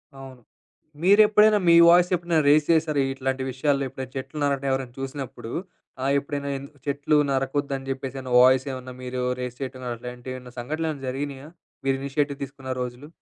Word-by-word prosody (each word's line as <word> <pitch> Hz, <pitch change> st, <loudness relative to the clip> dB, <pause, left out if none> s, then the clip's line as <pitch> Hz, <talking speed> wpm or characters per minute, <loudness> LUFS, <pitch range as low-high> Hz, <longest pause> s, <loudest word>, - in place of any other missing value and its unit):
అవును. 135 Hz, -2 st, -11 dB, 0.6 s
మీరెప్పుడైనా 210 Hz, +2 st, +6 dB
మీ -, -, +7 dB
వాయిస్ 175 Hz, +1 st, +6 dB
ఎప్పుడైనా 170 Hz, -2 st, 0 dB
రెయిస్ 150 Hz, 0 st, +4 dB
చేసారా 155 Hz, -3 st, +2 dB
ఇట్లాంటి 135 Hz, 0 st, -2 dB
విషయాల్లో? 140 Hz, +2 st, 0 dB
ఎప్పుడైనా 130 Hz, 0 st, -7 dB
చెట్లు 135 Hz, +3 st, -6 dB
నరకడం 140 Hz, -1 st, 0 dB
ఎవరైనా 130 Hz, -2 st, -2 dB
చూసినప్పుడు, 135 Hz, -4 st, -6 dB, 0.5 s
ఆహ్, 135 Hz, +1 st, +2 dB
ఎప్పుడైనా 140 Hz, 0 st, -5 dB
ఎందు 140 Hz, +1 st, -10 dB, 0.2 s
చెట్లు 145 Hz, +1 st, +1 dB
నరకొద్దని 135 Hz, 0 st, -1 dB
జెప్పేసని 130 Hz, -1 st, -5 dB
వాయిస్ 130 Hz, +1 st, +5 dB
ఏమన్నా 130 Hz, -1 st, -7 dB
మీరు 125 Hz, 0 st, -4 dB, 0.2 s
రెయిస్ 125 Hz, -1 st, -5 dB
చేయటం 130 Hz, -1 st, -6 dB
అట్లాంటివేమన్నా 125 Hz, +1 st, -8 dB
సంఘటలేమన్నా 155 Hz, +2 st, -3 dB
జరిగినియా? 140 Hz, +1 st, -5 dB, 0.4 s
మీరు 135 Hz, 0 st, +2 dB
ఇనీషియేటివ్ 140 Hz, +1 st, -1 dB
తీసుకున్న 135 Hz, -1 st, -9 dB
రోజులు? 125 Hz, +3 st, -6 dB
135 Hz, 145 wpm, -25 LUFS, 130-145 Hz, 0.6 s, మీ